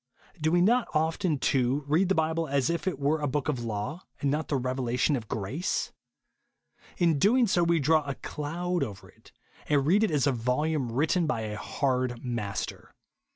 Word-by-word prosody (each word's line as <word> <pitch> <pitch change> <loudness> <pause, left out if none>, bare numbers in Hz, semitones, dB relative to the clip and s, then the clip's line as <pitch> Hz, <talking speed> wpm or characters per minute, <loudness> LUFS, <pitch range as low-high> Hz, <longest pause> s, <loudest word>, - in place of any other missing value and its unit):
Do 155 +2 +1
wo 175 - +5
not 235 +7 +3
often, 160 +1 +1
too, 135 +1 +1
read 170 +6 +2
the 195 - +3
Bible 160 +1 0
as 140 0 +1
if 170 +3 -3
it 180 - 0
were 145 +3 0
a 145 - 0
book 145 +2 -1
of 130 -6 -1
law, 115 - -4 0.2
and 140 - 0
not 150 +1 -1
the 145 - -1
re 130 -1 -1
velation 130 +2 +1
of 115 -4 -5
grace? 125 - -2 1.1
In 175 -2 +3
so - - -1
doing, 235 - +4 0.2
we 170 -1 +3
draw 155 +2 +3
a 140 - -2
cloud 170 +3 -3
over 105 -7 -7
it, - - -21 0.4
and 145 -2 +3
read 195 +8 +4
it 220 - +2
as 145 -4 +1
a 140 - +3
volume 125 +2 -1
written 160 +7 +1
by 135 -7 -1
a 105 -1 -4
hard 125 0 -1
master. 115 -5 -4
145 Hz, 195 wpm, -28 LUFS, 125-165 Hz, 1.1 s, wo